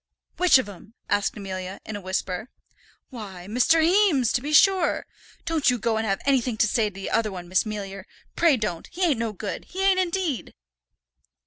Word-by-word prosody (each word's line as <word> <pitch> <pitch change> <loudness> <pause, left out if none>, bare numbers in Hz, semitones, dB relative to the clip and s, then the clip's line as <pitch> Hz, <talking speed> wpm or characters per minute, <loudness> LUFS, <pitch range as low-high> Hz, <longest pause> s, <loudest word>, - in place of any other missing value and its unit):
"Which 360 -6 +6
of 260 - -1
'em?" 205 +3 -13 0.2
asked 205 +1 +1
Amelia, 190 -1 -6
in 220 - -6
a 205 - -6
whisper. 185 +3 -3 0.6
"Why, 195 -7 -8
Mr. 250 +9 +3
Heames, 335 - +3
to 245 - +1
be 290 +3 -4
sure. 375 +1 +4 0.4
Don't 320 -5 +2
you 250 - +2
go 225 0 0
and 220 0 -1
have 195 -1 -1
anythink 255 -5 +1
to - - +4
say 220 -1 +1
to - - -19
the 195 - -6
other 220 -2 +1
one, 180 -2 -8
Miss 185 +4 +1
Mealyer, 195 -2 -6 0.3
pray 325 -5 +4
don't; 210 -7 -3
he 365 +2 -3
ain't 300 -9 +2
no 230 -1 -1
good; 205 0 -6
he 380 +2 -4
ain't 385 -1 +4
indeed." 355 -6 -2
225 Hz, 195 wpm, -25 LUFS, 200-315 Hz, 0.6 s, Which